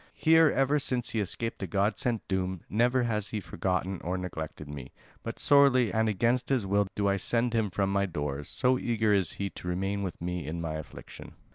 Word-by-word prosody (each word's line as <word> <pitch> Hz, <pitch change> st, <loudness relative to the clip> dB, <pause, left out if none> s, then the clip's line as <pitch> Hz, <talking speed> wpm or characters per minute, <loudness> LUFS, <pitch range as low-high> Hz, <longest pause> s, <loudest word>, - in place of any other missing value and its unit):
Here, 160 Hz, 0 st, +5 dB
ever 140 Hz, +2 st, +2 dB
since 125 Hz, -3 st, 0 dB
he 115 Hz, -, -1 dB
escaped 115 Hz, +3 st, -3 dB
the 95 Hz, -, -4 dB
god 100 Hz, +4 st, 0 dB
sent 120 Hz, -3 st, -1 dB
doom, 95 Hz, -2 st, -2 dB
never 125 Hz, +4 st, +2 dB
has 105 Hz, -3 st, -1 dB
he 110 Hz, -, -3 dB
forgotten 95 Hz, 0 st, -2 dB
or 90 Hz, +2 st, -2 dB
neglected 80 Hz, -4 st, -6 dB
me; 70 Hz, -3 st, -8 dB, 0.3 s
but -, -, -6 dB
sorely 140 Hz, -5 st, +5 dB
and 110 Hz, 0 st, +2 dB
against 120 Hz, +5 st, +1 dB
his 130 Hz, -6 st, +1 dB
will 100 Hz, +1 st, +2 dB
do 100 Hz, -1 st, 0 dB
I 100 Hz, 0 st, +2 dB
send 120 Hz, +4 st, 0 dB
him 110 Hz, -3 st, +1 dB
from 95 Hz, +1 st, -1 dB
my 100 Hz, 0 st, +1 dB
doors, 75 Hz, -4 st, -4 dB
so 125 Hz, 0 st, +2 dB
eager 110 Hz, -3 st, +1 dB
is 95 Hz, -6 st, +1 dB
he 100 Hz, -1 st, -4 dB
to -, -, -9 dB
remain 95 Hz, +3 st, -1 dB
with 95 Hz, -3 st, -4 dB
me 90 Hz, -3 st, -4 dB
in 85 Hz, +2 st, -4 dB
my 80 Hz, -2 st, -3 dB
affliction." 80 Hz, -2 st, -9 dB
100 Hz, 210 wpm, -29 LUFS, 90-120 Hz, 0.3 s, Here